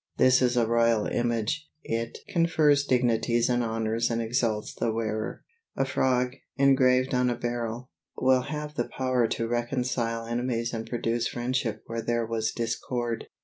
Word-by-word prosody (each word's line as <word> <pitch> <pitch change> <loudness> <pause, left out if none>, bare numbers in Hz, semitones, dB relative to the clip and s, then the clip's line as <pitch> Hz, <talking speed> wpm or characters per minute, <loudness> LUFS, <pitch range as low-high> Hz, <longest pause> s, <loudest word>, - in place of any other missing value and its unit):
This 130 0 +5
is 125 -1 +2
a 120 - +4
royal 115 -1 +2
image; 120 +6 -1
it 115 +1 -3
confers 155 -4 +3
dignities 120 -2 +2
and 120 0 +2
honors 115 +1 0
and 115 -1 -1
exalts 115 -2 -1
the 115 - -1
wearer. 110 -1 -3 0.3
A 135 - +2
frog, 125 -1 +1 0.2
engraved 130 -2 +4
on 125 0 +2
a 120 - 0
beryl, 120 +1 -4 0.3
will 130 0 +4
have 150 +2 -5
the - - -2
power 130 -3 +2
to 115 - -2
reconcile 120 -1 -1
enemies 120 0 -2
and 115 0 -4
produce 115 -1 0
friendship 120 -2 -2
where 115 0 -4
there 115 0 0
was 110 -1 -1
discord. 120 0 -3
120 Hz, 150 wpm, -27 LUFS, 115-130 Hz, 0.3 s, This